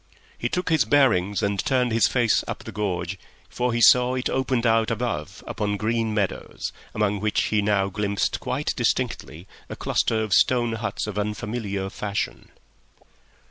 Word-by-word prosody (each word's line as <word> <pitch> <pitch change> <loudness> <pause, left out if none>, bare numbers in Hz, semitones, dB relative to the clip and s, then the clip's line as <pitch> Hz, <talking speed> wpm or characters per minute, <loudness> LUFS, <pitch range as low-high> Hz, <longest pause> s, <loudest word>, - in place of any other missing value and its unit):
He - - -2
took 180 0 -2
his 160 -6 +4
bearings 105 -6 +2
and 100 -1 0
turned 125 -2 +1
his 115 -2 +4
face 120 -3 +2
up - - -5
the - - -7
gorge, 95 -3 -3 0.3
for 125 0 -1
he 120 0 0
saw 125 +1 +6
it 130 - -1
opened 130 -2 0
out 115 -1 +3
above - - -3
upon 105 -1 -2
green 115 +1 0
meadows, 105 -3 -3 0.2
among 105 -1 +1
which 105 +1 +1
he 105 -1 +1
now 100 -1 +2
glimpsed 100 +1 -1
quite - - -2
distinctly 80 +4 -2 0.2
a - - -5
cluster 110 -1 0
of 105 -3 -2
stone 120 +1 +3
huts 105 -3 -3
of 105 -1 -4
unfamiliar 105 -2 -3
fashion. 105 -1 -4
105 Hz, 160 wpm, -24 LUFS, 100-120 Hz, 0.3 s, saw